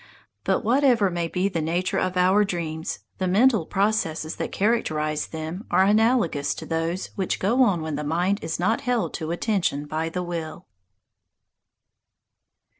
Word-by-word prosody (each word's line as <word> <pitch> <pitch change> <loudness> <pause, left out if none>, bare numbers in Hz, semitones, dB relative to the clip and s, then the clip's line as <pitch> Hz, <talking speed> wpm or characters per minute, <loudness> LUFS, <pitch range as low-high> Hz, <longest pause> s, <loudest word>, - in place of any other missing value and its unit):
But - - +1
whatever 240 -4 +3
may 170 -1 -1
be 180 +3 0
the 175 -5 -2
nature 175 +4 0
of 185 0 -1
our 190 +3 +4
dreams, 165 -4 -4 0.2
the 185 - 0
mental 215 -1 +3
processes 190 -6 0
that - - -3
characterize 155 -9 0
them 160 +5 -6
are 190 - +4
analogous 210 - +2
to - - -7
those 165 +3 -2
which 190 -2 -1
go 235 +7 +2
on 195 -10 +3
when 155 -2 -3
the 150 - -3
mind 175 +7 0
is 160 0 -3
not 210 +6 +1
held 245 -3 -1
to 160 -3 -4
attention 175 -5 -1
by 155 +2 -2
the 180 +2 -3
will. 170 -1 -5
180 Hz, 155 wpm, -24 LUFS, 160-205 Hz, 0.2 s, our